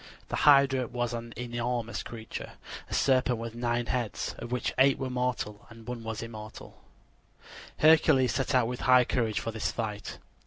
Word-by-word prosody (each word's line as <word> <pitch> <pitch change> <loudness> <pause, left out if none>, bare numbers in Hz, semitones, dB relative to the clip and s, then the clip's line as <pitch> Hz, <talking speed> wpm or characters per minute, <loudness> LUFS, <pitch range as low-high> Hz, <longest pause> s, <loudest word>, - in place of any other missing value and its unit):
The - - -2
hydra 135 -3 +5
was 120 0 -2
an 115 0 -5
enormous 120 -1 -3
creature 110 -1 -8 0.4
a - - -6
serpent 130 -2 +2
with 115 0 -6
nine 120 0 -1
heads, 120 -6 -2
of 120 - -7
which 125 - -1
eight 135 +1 +5
were 130 -1 -3
mortal 125 -4 -3
and 115 -1 -14
one 120 -2 -5 0.2
immortal. 110 -2 -10 1.0
Hercules 155 -4 +5
set 135 0 0
out 125 -2 +4
with 125 +1 -4
high 125 -1 +5
courage 115 -4 0
for 115 - -4
this 110 -1 -2
fight. 105 -3 -5
120 Hz, 160 wpm, -29 LUFS, 115-130 Hz, 1.0 s, hydra